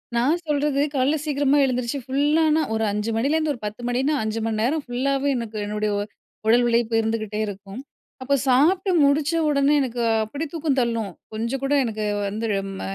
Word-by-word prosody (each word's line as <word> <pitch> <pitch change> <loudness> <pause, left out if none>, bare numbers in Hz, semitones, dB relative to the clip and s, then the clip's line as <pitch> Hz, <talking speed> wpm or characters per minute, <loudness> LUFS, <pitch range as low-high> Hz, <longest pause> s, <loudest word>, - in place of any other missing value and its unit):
நான் 290 +9 +2
சொல்றது 290 -1 +1
காலைல 275 +4 +2
சீக்கிரமா 290 -1 +2
எழுந்திரிச்சி 250 +1 -1
ஃபுல்லானா 300 +4 +2
ஒரு 220 - 0
5:00 210 +2 -2
மணிலேருந்து 300 +4 +1
ஒரு 240 - -10
10:00 210 +3 -6
மணினா 260 +5 +1
5 220 +1 -2
மண் 220 -1 -1
நேரம் 295 +5 0
ஃபுல்லாவே 275 +3 0
எனக்கு 225 -2 -5
என்னுடைய 210 0 -2 0.6
உடல் 240 +2 +5
உழைப்பு 235 -1 +1
இருந்துக்ட்டே 220 -1 -2
இருக்கும். 200 +3 -8 0.4
அப்போ 280 +2 +2
சாப்ட்டு 345 +10 +3
முடிச்ச 285 +3 +2 0.2
உடனே 285 0 +3
எனக்கு 245 -2 -2 0.2
அப்பிடி 285 +9 -5
தூக்கம் 300 -4 -1
தள்ளும். 230 -4 -1 0.2
கொஞ்சம் 235 +5 -3
கூட 275 +1 +1
எனக்கு 215 -2 -3 0.2
வந்து 215 +3 -3
ழ 195 - +1 0.2
ம - - -7
255 Hz, 165 wpm, -23 LUFS, 225-290 Hz, 0.6 s, உடல்